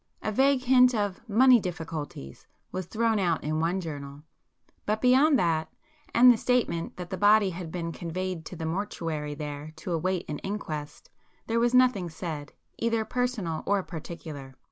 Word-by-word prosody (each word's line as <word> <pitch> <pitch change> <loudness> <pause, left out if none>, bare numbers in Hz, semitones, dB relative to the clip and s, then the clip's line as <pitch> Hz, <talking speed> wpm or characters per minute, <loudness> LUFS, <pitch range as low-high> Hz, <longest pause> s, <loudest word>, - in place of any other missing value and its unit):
A 215 - -1
vague 265 +3 +3
hint 250 -1 +5
of 205 -3 -1
'money 250 +3 +6
difficulties' 160 - -6 0.2
was 185 -2 -4
thrown 225 0 +1
out 175 -4 0
in 155 +1 -1
one 170 +4 0
journal,—but 150 +6 -7
beyond 265 +5 +5
that, 165 -6 0 0.4
and 250 +1 +8
the - - -3
statement 220 -9 0
that 180 -1 -7
the 190 - -2
body 205 -1 +5
had 170 -2 -7
been 165 -1 -3
conveyed 180 0 -4
to - - -8
the 160 - -5
mortuary 160 -4 -3
there 150 0 -6
to 160 +3 -6
await 180 +2 -1
an 150 - -4
inquest, 155 -7 -6 0.3
there 230 +1 0
was 240 +1 +2
nothing 245 -9 +4
said, 160 -3 -6 0.3
either 230 -1 0
personal 235 -11 -2
or 200 -1 +2
particular. 155 -5 -8
180 Hz, 160 wpm, -27 LUFS, 160-225 Hz, 0.4 s, and